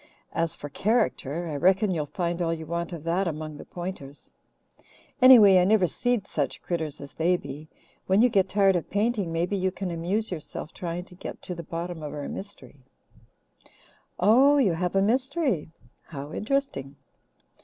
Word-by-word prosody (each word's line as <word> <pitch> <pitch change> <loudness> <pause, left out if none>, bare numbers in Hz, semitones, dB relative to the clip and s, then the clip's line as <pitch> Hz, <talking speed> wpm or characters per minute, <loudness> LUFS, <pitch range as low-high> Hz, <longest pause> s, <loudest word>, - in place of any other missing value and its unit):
As 165 -2 -1
for 145 - -7
'character,' 175 - 0
I 155 - -4
reckon 190 +5 +3
you'll 155 -4 -2
find 175 +2 -2
all 165 -1 +1
you 160 -1 -4
want 170 +2 -3
of 165 -4 -7
that 175 +3 0
among 155 -1 -5
the - - -10
Pointers; 175 -6 -8 0.9
anyway, 220 -7 +9
I - - +4
never 200 0 +4
seed 245 +3 -1
such 145 -8 -2
critters 160 -4 -3
as 140 0 -10
they 175 +3 +2
be. 150 0 -9 0.4
When 190 +2 +3
you - - +7
get 195 -4 +2
tired 195 -1 +3
of 175 - -2
painting, 205 -3 0
maybe 170 +4 -1
you 190 -1 +1
can 185 -1 -5
amuse 185 +7 -1
yourself 155 -2 -6
trying 175 0 -5
to - - -16
get 180 - -8
to 180 - -5
the 170 - -6
bottom 170 +1 -5
of 150 0 -6
our 145 -1 -5
mystery." 145 -9 -8 1.4
"Oh, 255 +10 +5 0.2
have 175 +2 -2
you - - +5
a - - +3
mystery? 255 - 0 0.4
How 145 -1 -8
interesting!" 215 - -2
175 Hz, 175 wpm, -26 LUFS, 160-200 Hz, 1.4 s, anyway